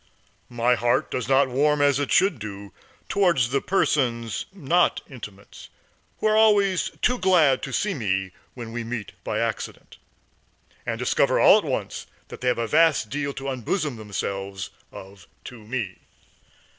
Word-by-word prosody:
My 120 +1 +2
heart 120 0 +1
does 125 -1 -3
not 135 0 +4
warm 145 +3 +1
as 145 -1 +3
it 145 - -2
should 180 -7 +3
do 100 -1 -8 0.3
towards 170 -12 +2
the 140 - +1
persons, 120 - 0
not 175 -1 +1
intimates, 105 -7 -11 0.5
who - - -5
are 215 0 +4
always 205 -4 +3
too 250 0 +2
glad 165 -8 +4
to 135 - -5
see 205 +10 0
me 95 - -2 0.2
when 120 -3 -7
we 120 0 -4
meet 115 -3 -5
by - - -2
accident, - - -4 0.9
and - - -1
discover - - +2
all - - +7
at - - -7
once - - -4 0.2
that - - -10
they 125 - -2
have 125 - +2
a 115 - -1
vast 155 -6 +3
deal 140 0 -2
to 135 0 -5
unbosom 135 - -2
themselves 100 -2 -5 0.2
of 95 -2 -12 0.2
to 125 - -10
me. 110 -4 -4
130 Hz, 155 wpm, -24 LUFS, 110-155 Hz, 0.9 s, all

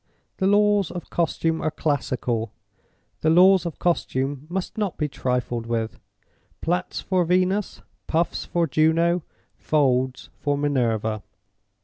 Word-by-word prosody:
The 190 - +1
laws 205 -2 +3
of 175 - -8
costume 165 -1 0
are 155 - +1
classical; 125 -7 -1 0.7
the 155 - +2
laws 185 +2 +6
of 165 - -6
costume 140 -4 -1
must 185 +1 -3
not 205 -4 -2
be 150 - 0
trifled 125 -3 -2
with! 115 -1 -2 0.6
Plaits 175 +3 -2
for 185 -1 +1
Venus, 185 +3 0 0.2
puffs 165 +1 0
for 170 -1 0
Juno, 165 +4 +2 0.4
folds 130 -4 +1
for 145 -1 0
Minerva. 115 -7 0
160 Hz, 120 wpm, -24 LUFS, 130-180 Hz, 0.7 s, laws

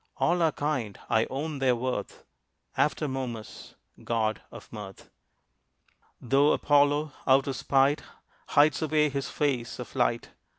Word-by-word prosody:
All 175 +1 +2
are 160 -1 +3
kind, 135 -10 -3
I 110 0 +3
own 145 +2 -4
their 130 -2 +3
worth, 125 +1 -4 0.5
After 150 0 +1
Momus, 125 -5 -6 0.3
god 110 -2 -1
of - - -12
mirth. - - -10 1.1
Though 135 +4 +3
Apollo, 145 +1 +2 0.2
out 135 0 +5
of 135 - -3
spite, 135 +4 +2 0.5
Hides 150 +3 +3
away 155 -1 +2
his 140 -1 -3
face 130 -5 -1
of 125 - -9
light. 120 -2 0
135 Hz, 130 wpm, -27 LUFS, 125-150 Hz, 1.1 s, out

